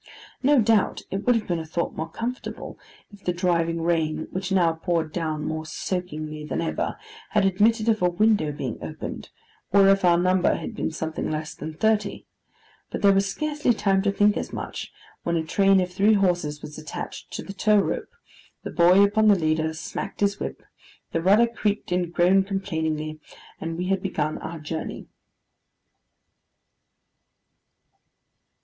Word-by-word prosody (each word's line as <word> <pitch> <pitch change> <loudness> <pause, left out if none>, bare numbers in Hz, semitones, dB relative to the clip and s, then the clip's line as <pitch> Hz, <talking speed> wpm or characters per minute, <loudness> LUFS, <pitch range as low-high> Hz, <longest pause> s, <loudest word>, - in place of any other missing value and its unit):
No 280 +1 +5
doubt 220 -2 +2
it 195 +4 -4
would 245 - +5
have 220 -2 -1
been 175 -2 -1
a - - -4
thought 170 +2 -2
more 160 +1 -4
comfortable 240 +8 -5 0.3
if 205 - -15
the 180 - +1
driving 170 -2 0
rain, 160 -2 0
which 185 +1 -4
now 175 -4 +3
poured 165 -1 -1
down 155 -3 -2
more 160 0 -3
soakingly 155 -2 -4
than 150 - -3
ever, 165 - -2 0.3
had 210 -2 +2
admitted 215 +4 +3
of 220 -3 +2
a 180 - +4
window 185 -4 +2
being 130 -5 -5
opened, - - -6 0.4
or 195 0 +6
if 195 0 +4
our 175 -1 +5
number 185 +1 +3
had - - -5
been - - -1
something 160 0 -4
less 155 0 -3
than 155 +2 -7
thirty; 215 +1 0 0.6
but - - -5
there 200 -1 +7
was 195 0 +2
scarcely 295 +1 0
time 195 -2 +2
to 200 0 +1
think 205 +1 +3
as - - -4
much, - - -6 0.3
when 170 - -1
a 165 - 0
train 195 +4 +4
of 180 -1 -2
three 200 +4 +4
horses 175 -7 +1
was 150 +1 -8
attached 155 - -7
to - - -4
the 195 - -8
tow 210 +1 +3
rope, 200 - 0 0.5
the - - -5
boy 180 +3 +6
upon 215 +2 +3
the 205 -2 +6
leader 160 -1 +1
smacked 160 +5 -6
his 200 0 +1
whip, - - -5 0.5
the 165 - 0
rudder 205 +7 +5
creaked 210 -5 -2
and 180 -1 0
groaned 190 +3 +3
complainingly, 160 -6 -2 0.4
and 165 0 -4
we 180 - -2
had 195 +1 0
begun 155 -5 -2
our 170 - -6
journey. 155 +1 -5
180 Hz, 170 wpm, -25 LUFS, 160-200 Hz, 0.6 s, there